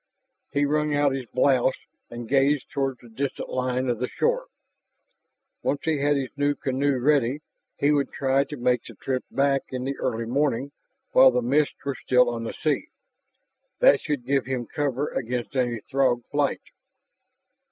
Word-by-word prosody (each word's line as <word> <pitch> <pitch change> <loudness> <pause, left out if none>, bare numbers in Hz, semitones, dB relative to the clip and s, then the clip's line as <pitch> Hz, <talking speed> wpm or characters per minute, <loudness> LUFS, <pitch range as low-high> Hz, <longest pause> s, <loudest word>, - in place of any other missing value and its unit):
He 145 0 +2
wrung 150 0 +1
out 145 -1 +3
his 135 -2 -4
blouse 130 +1 +2 0.3
and 120 -1 -7
gazed 140 +1 +2
toward 135 -2 -1
the - - -13
distant 135 +5 -4
line 130 0 -1
of 120 -3 -1
the 125 - -1
shore. - - 0 1.1
Once 140 - -1
he 160 -3 0
had 145 +1 +2
his 135 -2 -2
new 145 0 +1
canoe 135 +1 0
ready 140 +1 +2 0.4
he 145 - +3
would 145 -2 +1
try 135 0 +1
to 150 +1 -8
make 125 -1 +1
the 115 - -12
trip 130 +4 -3
back 140 0 +2
in 130 -1 -4
the 135 +1 -2
early 115 +1 -1
morning 135 +1 0 0.4
while 130 - +8
the 125 -1 0
mists 140 +5 +2
were 140 - -1
still 125 -1 +3
on 115 -1 -4
the - - -4
sea. 155 - +1 0.9
That - - +5
should 145 -5 -3
give 135 -2 +1
him 130 -2 -2
cover 145 +2 -2
against 125 +1 -3
any 120 -3 0
Throg 130 -2 +1
flight. 145 -1 0
135 Hz, 170 wpm, -25 LUFS, 125-145 Hz, 1.1 s, while